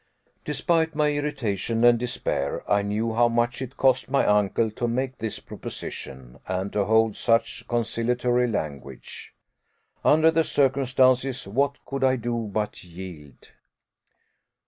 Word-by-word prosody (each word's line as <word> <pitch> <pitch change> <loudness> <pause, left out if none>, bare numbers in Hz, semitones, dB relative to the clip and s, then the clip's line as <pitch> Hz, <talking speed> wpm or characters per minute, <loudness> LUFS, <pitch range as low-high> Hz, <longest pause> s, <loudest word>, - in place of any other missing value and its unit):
Despite 160 +2 0
my 150 -1 +2
irritation 120 -7 -2
and 120 -1 +6
despair, 120 - -2
I 100 0 +3
knew 105 +3 -1
how 120 +1 +4
much 120 +2 0
it 130 +1 -7
cost 130 -1 +2
my 140 - +2
uncle 105 +2 +2
to 120 +3 -2
make 130 +2 -2
this 110 -2 -4
proposition, 65 -2 -7
and 95 +1 -3
to 100 -1 +1
hold 110 0 +3
such 115 0 0
conciliatory 120 +1 0
language. 70 - -6 0.7
Under 160 +2 +5
the 165 0 +2
circumstances, 130 -3 +2
what 140 +7 -1
could 135 -1 -3
I 130 0 +4
do 120 -2 -3
but 105 +1 -3
yield? 85 -6 -11
120 Hz, 130 wpm, -25 LUFS, 105-130 Hz, 0.7 s, and